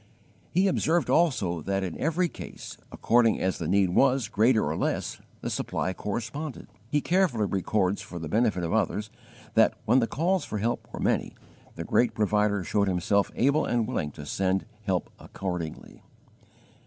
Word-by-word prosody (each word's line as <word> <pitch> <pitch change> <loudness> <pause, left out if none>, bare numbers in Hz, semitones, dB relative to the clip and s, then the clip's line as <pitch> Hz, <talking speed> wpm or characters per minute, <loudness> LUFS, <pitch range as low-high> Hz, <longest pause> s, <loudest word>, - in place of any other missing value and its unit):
He 185 +3 +2
observed 175 -2 +1
also 105 - +2
that 95 +4 -1
in 90 -3 -4
every 165 +3 +1
case, - - -9 0.2
according 115 -1 +3
as 95 0 -1
the - - -3
need 95 -2 +3
was 130 +4 +3
greater 110 +2 +3
or - - -1
less, - - -2 0.2
the - - -3
supply 95 - -2
corresponded. 120 - -5 0.2
He 145 +2 +1
carefully 170 - +2
records 95 0 0
for 90 - -8
the 80 -2 -5
benefit 105 0 +1
of 85 - -2
others 110 0 0 0.4
that, - - +4
when 120 +4 +5
the 115 - +1
calls 180 +8 0
for 105 - -4
help 115 +4 -2
were - - -7
many, - - 0 0.4
the - - -5
Great 120 - +2
Provider 105 -2 +1
showed 100 +4 +1
Himself 95 +2 +1
able 140 +5 +3
and 120 -2 0
willing 75 - -2
to 75 - -9
send 95 +4 0 0.2
help 95 -4 -1
accordingly. 90 -5 -6
105 Hz, 165 wpm, -27 LUFS, 95-130 Hz, 0.4 s, when